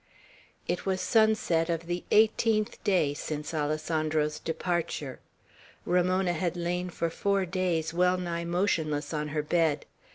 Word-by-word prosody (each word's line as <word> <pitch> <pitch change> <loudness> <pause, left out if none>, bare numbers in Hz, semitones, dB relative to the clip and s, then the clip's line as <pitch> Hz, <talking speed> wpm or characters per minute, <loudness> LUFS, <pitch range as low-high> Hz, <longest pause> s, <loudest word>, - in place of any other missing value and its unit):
It - - -1
was 190 -1 +1
sunset 215 -8 +2
of 165 0 -1
the 175 +1 -3
eighteenth 220 0 +2
day 175 -9 +2
since 150 +1 -5
Alessandro's 155 0 0
departure. 160 -5 -3 0.7
Ramona 180 +1 +2
had 175 +1 -2
lain 180 +1 -2
for 170 -1 -2
four 200 +2 +1
days 170 -3 -1
well 180 +1 +3
nigh 170 -1 -3
motionless 170 -4 0
on 150 -1 -1
her 150 0 -2
bed. 155 -2 +1
170 Hz, 130 wpm, -28 LUFS, 155-185 Hz, 0.7 s, well